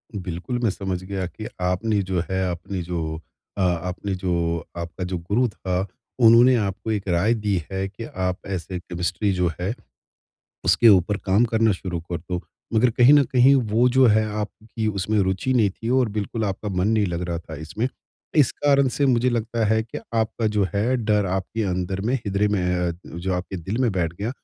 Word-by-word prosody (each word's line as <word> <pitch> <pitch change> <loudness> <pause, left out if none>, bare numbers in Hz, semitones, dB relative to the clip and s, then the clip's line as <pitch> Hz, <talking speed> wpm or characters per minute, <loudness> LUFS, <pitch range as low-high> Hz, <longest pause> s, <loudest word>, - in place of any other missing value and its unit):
बिल्कुल 95 +5 -4
मैं 115 - +3
समझ 95 -2 -3
गया 95 0 -3
कि 95 +6 -8
आपने 100 +4 +1
जो 95 -2 +1
है 95 -1 0
अपनी 90 +2 -5
जो 80 -2 -3 0.4
अ, - - 0
आपने 90 +2 -1
जो 85 -3 -1
आपका 85 +2 -5
जो 90 0 -2
गुरु 100 +9 +1
था 95 -3 -2 0.4
उन्होंने 120 +3 +7
आपको 105 0 -2
एक 100 -2 -2
राय 90 +6 +3
दी 105 -3 -1 0.2
है 95 0 -2
कि 100 +4 -9
आप 90 -4 -2
ऐसे 95 -1 -4
केमिस्ट्री 90 +3 -2
जो 90 -1 +1
है, 95 +5 -1 0.9
उसके 120 - +5
ऊपर 100 0 +5
काम 100 +5 +4
करना 115 -1 +2
शुरू 90 -2 -4
कर 85 +1 -5
दो। 90 +2 -4 0.3
मगर 120 +3 +4
कहीं 125 +4 +6
न 145 - +7
कहीं 130 +2 +6 0.2
वो 120 +4 +4
जो 130 +1 +5
है 110 -1 +4 0.2
आपकी 110 +1 -5
उसमें 105 +1 0
रुचि 95 +6 +1
नहीं 110 -5 +3
थी 115 +4 -7
और 125 -3 +2
बिल्कुल 110 +2 -2
आपका 100 +1 -3
मन 95 0 0
नहीं 110 -2 +2
लग 85 -1 -3
रहा 85 -1 -2
था 80 -1 -9
इसमें, 80 - -3 0.5
इस 145 -6 +5
कारण 140 -2 +3
से 140 +3 +1
मुझे 125 -1 +3
लगता 115 -1 -1
है 110 +1 +2
कि 110 - -7 0.2
आपका 110 0 0
जो 100 - +3
है 115 +6 +2
डर 105 -4 +1
आपके 95 +4 -2
अंदर 95 0 -2
में 115 +6 0
हृदय 100 +1 +1
में 90 -3 0
अ, - - -1
जो 85 +3 -4
आपके 90 +1 -4
दिल 95 +6 -4
में 120 - +3
बैठ 85 -3 -1
गया, 100 +6 -4
100 Hz, 195 wpm, -23 LUFS, 90-110 Hz, 0.9 s, उन्होंने